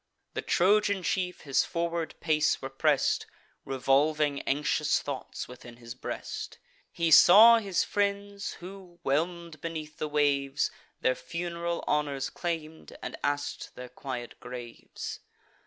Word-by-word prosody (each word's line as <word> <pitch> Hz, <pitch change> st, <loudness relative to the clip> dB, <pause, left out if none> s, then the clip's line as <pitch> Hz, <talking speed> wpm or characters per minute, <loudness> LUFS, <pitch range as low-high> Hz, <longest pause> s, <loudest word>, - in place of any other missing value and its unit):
The -, -, -2 dB
Trojan 200 Hz, +1 st, +3 dB
chief 180 Hz, -1 st, -1 dB
his 140 Hz, -2 st, +2 dB
forward 170 Hz, -1 st, -2 dB
pace 155 Hz, -2 st, +2 dB
repress'd, 135 Hz, +2 st, +1 dB, 0.4 s
Revolving 140 Hz, +2 st, +2 dB
anxious 150 Hz, +2 st, +1 dB
thoughts 140 Hz, -2 st, -5 dB
within 120 Hz, -1 st, -12 dB
his 115 Hz, -1 st, -9 dB
breast, 130 Hz, -, -6 dB, 0.3 s
He 165 Hz, -1 st, 0 dB
saw 225 Hz, +9 st, +9 dB
his 195 Hz, -4 st, 0 dB
friends, 200 Hz, 0 st, -1 dB
who, 185 Hz, -1 st, -11 dB
whelm'd 165 Hz, +2 st, -1 dB
beneath 155 Hz, -2 st, -6 dB
the 155 Hz, -, -2 dB
waves, 140 Hz, -2 st, +1 dB, 0.3 s
Their 130 Hz, -, +3 dB
fun'ral 170 Hz, +2 st, -4 dB
honours 145 Hz, -2 st, 0 dB
claim'd, 160 Hz, -2 st, -5 dB
and -, -, -4 dB
ask'd 145 Hz, 0 st, -2 dB
their 125 Hz, 0 st, -8 dB
quiet 125 Hz, -1 st, -6 dB
graves. 120 Hz, -1 st, -7 dB
155 Hz, 120 wpm, -29 LUFS, 140-175 Hz, 0.4 s, saw